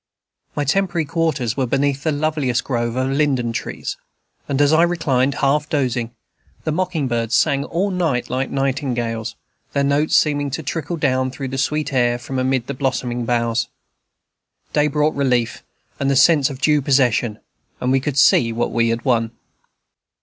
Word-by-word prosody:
My 145 - 0
temporary 175 +1 +1
quarters 150 -7 -1
were 130 -2 0
beneath 140 +2 0
the 155 - 0
loveliest 145 -4 0
grove 120 -2 -2
of 130 +1 0
linden 135 -5 +1
trees, - - -4 0.5
and 140 -1 0
as 145 +1 +4
I 160 - +5
reclined, 140 -6 +1
half 150 +2 +1
dozing, 125 -5 0 0.5
the 155 - -1
mocking 170 -4 -1
birds 115 -1 0
sang 140 +2 +2
all 190 +4 -1
night 165 -9 0
like 130 +2 -2
nightingales, 125 -5 -2 0.4
their 140 - +1
notes 140 +2 +2
seeming 145 -2 +2
to 155 +4 -4
trickle 160 +3 -3
down 130 -3 +1
through 130 +1 -6
the 135 +1 -3
sweet 150 +2 -1
air 120 -2 +2
from 130 +2 -5
amid 130 -1 0
the 140 - -4
blossoming 125 -3 -2
boughs. 115 0 0 1.1
Day 150 0 +3
brought 150 +1 +1
relief 125 -5 0 0.4
and 140 - 0
the 140 - +2
sense 145 0 +5
of 135 -2 -7
due 150 -1 +3
possession, 125 -5 +2 0.4
and 125 - 0
we 135 - +3
could 140 +1 -3
see 120 -4 +5
what 115 +1 -1
we 115 0 +2
had 115 +3 -2
won. 115 -3 +2
135 Hz, 170 wpm, -20 LUFS, 125-150 Hz, 1.1 s, I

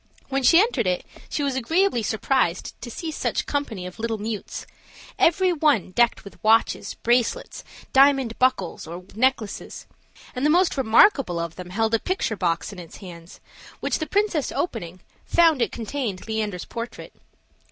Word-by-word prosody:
When 270 0 0
she 330 +6 +6
entered 330 - +2
it, 180 -1 -1 0.2
she 295 - -2
was 275 -2 -1
agreeably 320 +3 +1
surprised 220 -4 0
to 240 - -6
see 320 +7 -5
such - - -2
company 240 -10 -3
of 180 +4 -9
little 225 0 -2
mutes, 215 0 -5 0.5
every 365 +2 +4
one 290 - +2
decked 235 +4 +2
with 200 - -14
watches 225 +1 +2
bracelets, 240 - 0 0.3
diamond 270 -4 +4
buckles, 225 -11 0
or 175 +2 -7
necklaces; 230 -3 -1 0.5
and 250 - -4
the 300 - +4
most 355 +3 +3
remarkable 260 - +4
of 170 -1 -4
them 180 -1 -8
held 220 +4 0
a 225 - +4
picture 370 - -1
box 170 -1 -1
in 190 - -10
its 170 -2 -11
hand, 170 -3 -12 0.4
which - - -1
the 315 - -3
princess 400 -8 +1
opening, 185 - -4 0.2
found 330 -6 +4
it - - +1
contained 225 -5 -4
Leander's 215 -5 -3
portrait. 235 +1 -7
230 Hz, 160 wpm, -24 LUFS, 195-285 Hz, 0.5 s, she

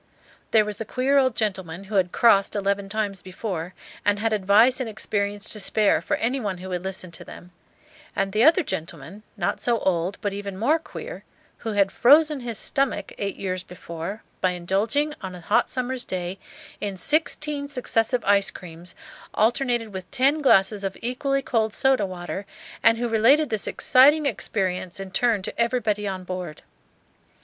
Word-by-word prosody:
There 220 -2 +4
was 210 -1 -4
the 225 - -4
queer 265 +5 +2
old 260 -3 +2
gentleman 190 -4 -3
who 200 +2 -11
had 185 -3 +2
"crossed" 200 -4 +4
eleven 200 0 -1
times 205 -2 -2
before, 185 -2 -5 0.3
and 205 0 +2
had 225 +1 0
advice 215 +6 +4
and 255 -3 -3
experience 205 -1 -2
to 215 - -1
spare 210 +1 +3
for - - -1
any 250 +4 -1
one 200 -6 -3
who 185 +1 -8
would 180 -1 -3
listen 190 -2 -6
to - - -8
them; 180 - -12 0.6
and 195 0 0
the 215 +2 +3
other 330 +5 +6
gentleman, 165 - -6 0.2
not - - -1
so 240 -1 +1
old 180 -1 -1
but 205 -1 -2
even 200 -1 -6
more 290 +11 +2
queer, - - -9 0.4
who 225 -2 -4
had 200 -1 +2
"frozen 300 +3 +5
his 235 -3 -5
stomach," 275 +2 -1
eight 200 -1 -2
years 185 -1 -3
before, 175 +2 -7 0.2
by 185 - +3
indulging, 210 - 0
on 190 -2 -6
a 180 - -10
hot 205 - +2
summer's 255 0 -3
day, 185 -1 -4 0.4
in 200 -2 -4
sixteen 300 - 0
successive 250 -3 0
ice 200 -2 +4
creams, 170 0 -10 0.4
alternated 235 -1 +1
with 185 -1 -7
ten 280 +4 +2
glasses 200 -6 +4
of 195 -1 -3
equally 275 +3 -1
cold 220 -4 0
soda 265 -7 +3
water, 185 +2 -6 0.3
and 225 0 +5
who 240 +1 -1
related 240 +7 +4
this 215 -2 -1
exciting 290 +4 +5
experience 185 -8 -2
in 195 -1 -7
turn 220 -1 +1
to 235 - -3
everybody 220 -4 0
on 190 -1 -4
board. 180 -4 -6
205 Hz, 175 wpm, -24 LUFS, 190-245 Hz, 0.6 s, other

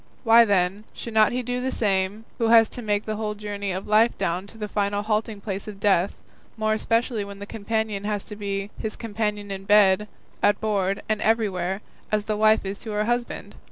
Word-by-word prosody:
Why, 230 0 +7
then, 195 0 +1
should 230 - -7
not 215 -1 +5
he 250 +1 -2
do 250 +1 -2
the 260 +1 -1
same 200 0 0
who 230 - +2
has 225 -1 +6
to 245 - -6
make 210 -2 -1
the 215 -1 -3
whole 210 -1 -2
journey 205 -1 -4
of 185 +1 -4
life 215 +3 +4
down 180 +3 -2
to 225 - -15
the 210 -1 -4
final 205 0 -1
halting 215 -1 -1
place 195 -1 -5
of 205 -2 -8
death, 195 -2 +1 0.3
more 215 0 +1
especially 230 0 0
when 200 0 -9
the 200 - -7
companion 220 -1 -2
has 210 -1 -1
to 210 - -8
be 200 0 -4
his 220 - -4
companion 210 -2 -3
in 195 0 -6
bed, 205 0 +5 0.3
at 205 0 +3
board, 200 -3 0
and 215 -1 0
everywhere, 195 -4 0 0.3
as 210 -1 +1
the 215 - -1
wife 215 0 +4
is 195 +1 -4
to 225 - -8
her 210 0 +1
husband? 240 +1 -2
210 Hz, 210 wpm, -24 LUFS, 200-220 Hz, 0.3 s, Why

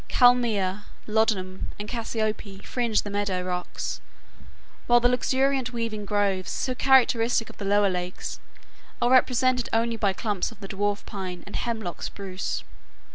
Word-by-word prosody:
Kalmia, 220 -6 +3 0.2
lodum, 210 -4 0
and 210 - -6
cassiope 215 -4 -3
fringe 235 -4 0
the 205 - -6
meadow 200 -3 -1
rocks, 180 0 -4 0.9
while 240 0 +6
the 245 - +4
luxuriant, 260 +1 +1
waving 225 -3 -3
groves, 200 -2 0
so 255 - -1
characteristic 245 -3 +3
of - - -22
the 200 - -4
lower 205 +1 +4
lakes, 180 0 -4 0.6
are 240 - +2
represented 255 -1 +3
only 230 0 +1
by 205 -3 +2
clumps 205 0 -2
of - - -15
the 200 - -7
Dwarf 205 +1 -1
Pine 185 -3 -6
and - - -9
Hemlock 220 -7 -3
Spruce. 195 -2 -4
215 Hz, 140 wpm, -26 LUFS, 195-240 Hz, 0.9 s, while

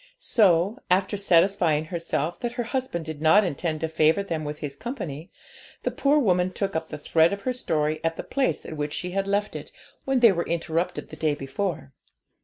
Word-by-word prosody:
So, 200 - +3
after 190 +3 +2
satisfying 175 -5 +3
herself 165 0 -2
that 240 -1 -3
her 245 -1 -2
husband 235 - -3
did 155 -2 -7
not 160 +7 +6
intend 160 -2 -2
to 160 - 0
favour 160 +4 +2
them 165 -5 -3
with 150 0 -5
his 145 -2 -5
company, 175 - -6 0.5
the - - 0
poor 285 +2 +2
woman 185 -9 +2
took 195 0 -3
up 160 0 -2
the - - -6
thread 160 +2 +3
of 200 0 -4
her 255 +4 -1
story 155 -9 -1
at 165 0 -1
the - - -4
place 275 -2 -1
at 160 - -6
which 145 0 -3
she 180 - -4
had 195 +1 -1
left 205 +1 0
it - - -7 0.3
when 270 -1 +2
they 230 -3 +8
were 170 -2 -2
interrupted 165 +1 -2
the - - -9
day 155 -1 0
before. 145 0 -4
170 Hz, 205 wpm, -25 LUFS, 155-200 Hz, 0.5 s, they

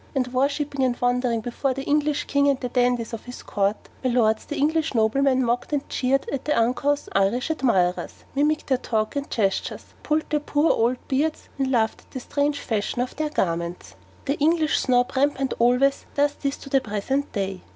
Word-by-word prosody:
and 255 -2 -1
worshipping 280 +1 0
and 250 -2 0
wondering 245 -2 +1
before 250 +3 -2
the 270 - -4
English 295 0 +1
king 280 0 +2
and 275 -2 +1
the 250 - -3
dandies 245 -2 +1
of 230 - -6
his 245 0 -9
court, 200 +1 0 0.3
my 255 - +2
lords 220 -3 +2
the 300 - -5
English 310 0 +1
noblemen 255 +4 +3
mocked 245 +5 -1
and 285 -1 -1
jeered 270 +1 0
at 275 - -3
their 300 - +1
uncouth 265 +5 +1
Irish 200 +9 +1
admirers, 190 - 0
mimicked 300 +2 +1
their 260 -2 +1
talk 220 -2 -1
and 280 0 -3
gestures, 195 -4 -2
pulled 305 +1 0
their 300 - +2
poor 295 +2 +2
old 240 +3 +2
beards, 300 +4 -1
and 270 -1 +1
laughed 225 -3 +1
at - - -27
the 260 - -6
strange 285 +3 -1
fashion 220 +1 -2
of 250 +1 -2
their 305 0 -1
garments. 170 - -2 0.3
The 280 +1 -1
English 310 +1 +2
Snob 245 -1 +2
rampant 270 -1 +1
always 250 +4 +3
does 290 0 +2
this 280 -1 -3
to 275 - -11
the 270 -1 +3
present 255 +6 -2
day. 195 -3 -3
260 Hz, 195 wpm, -24 LUFS, 235-285 Hz, 0.3 s, noblemen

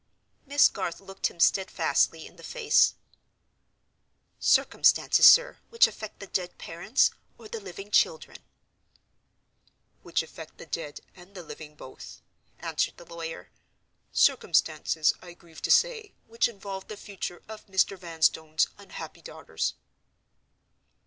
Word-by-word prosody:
Miss 285 +1 +6
Garth 185 -4 -5
looked 195 0 -3
him 170 - -13
steadfastly 190 +3 +2
in - - -14
the - - -16
face. 470 -4 +2 1.4
"Circumstances, - - +4
sir, - - +6
which 465 +1 +5
affect 215 -1 -7
the 200 - -8
dead 180 -2 -4
parents, 170 +9 +1 0.3
or 230 - -12
the 225 - -6
living 195 +1 -10
children?" 160 -5 +1 1.6
"Which - - -1
affect - - -12
the - - -11
dead 145 - -6
and 190 +2 -17
the 180 - -8
living 150 -1 -11
both," 130 -3 -12 0.3
answered - - -2
the 175 - -13
lawyer. 165 -1 -8 0.6
"Circumstances, 155 -2 +2
I 175 -1 -11
grieve 165 -2 -16
to - - -3
say, 450 -5 +2
which 230 +1 +1
involve 195 -4 -8
the 215 - -8
future 195 -4 -7
of 220 0 -11
Mr. 190 0 +1
Vanstone's 160 -3 0
unhappy - - -10
daughters." - - -4
190 Hz, 125 wpm, -27 LUFS, 170-215 Hz, 1.6 s, Miss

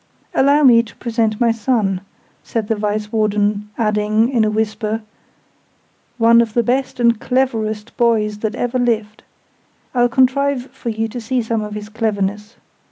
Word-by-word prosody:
"Allow 285 +2 +4
me 240 -4 +7
to 230 -1 -13
present 225 -3 -1
my 235 -2 +3
son," 220 -5 0 0.4
said 225 -3 -3
the 225 - +2
Vice 210 0 -2
warden; 210 -1 0
adding, 215 +1 +1
in 240 -4 +2
a 215 - +2
whisper, 215 0 -2 1.1
"one 230 0 +6
of 225 -2 -3
the 235 - +3
best 255 +2 -1
and 235 -2 +3
cleverest 225 -5 -1
boys 215 -3 +1
that 220 +1 -2
ever 245 +1 -1
lived! 220 -3 -1 0.7
I'll 245 -1 +3
contrive 260 +1 +1
for 240 - -6
you 225 0 -1
to 245 +2 -6
see 245 +2 -1
some 225 0 -1
of 210 0 -6
his 210 0 -6
cleverness. 210 -1 -2
225 Hz, 160 wpm, -18 LUFS, 210-240 Hz, 1.1 s, me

